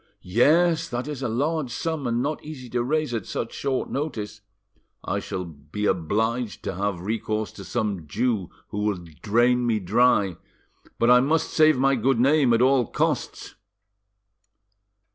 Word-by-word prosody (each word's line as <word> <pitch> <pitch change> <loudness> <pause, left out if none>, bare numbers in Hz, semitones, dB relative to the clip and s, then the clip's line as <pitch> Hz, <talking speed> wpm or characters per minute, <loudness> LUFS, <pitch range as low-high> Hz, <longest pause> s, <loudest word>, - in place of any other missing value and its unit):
"Yes, 160 - +3
that 120 +3 -3
is 145 -3 -5
a 130 - -1
large 145 +4 -1
sum, 150 +2 -3
and 120 +1 0
not 150 +2 -3
easy 135 -5 -9
to 120 - 0
raise 155 0 0
at 110 -5 -3
such 115 - -4
short 135 -2 -2
notice." 110 -8 -4 0.6
"I - - -1
shall 90 -1 -5
be 80 +5 -6
obliged 110 +7 -1
to - - -3
have 95 -1 -2
recourse 110 +1 -2
to - - -10
some 100 -7 -3
Jew, 110 - -1 0.2
who 105 - -4
will 105 -4 -1 0.2
drain 120 +3 +2
me 115 -2 +2
dry. 100 -2 +2 0.6
But 120 +1 +4
I 125 - +8
must 155 +5 +1
save 155 -2 +5
my 135 +1 +3
good 130 0 +1
name 135 0 +4
at 115 +1 +4
all 130 -3 +3
costs." - - -2
120 Hz, 160 wpm, -24 LUFS, 105-135 Hz, 0.6 s, I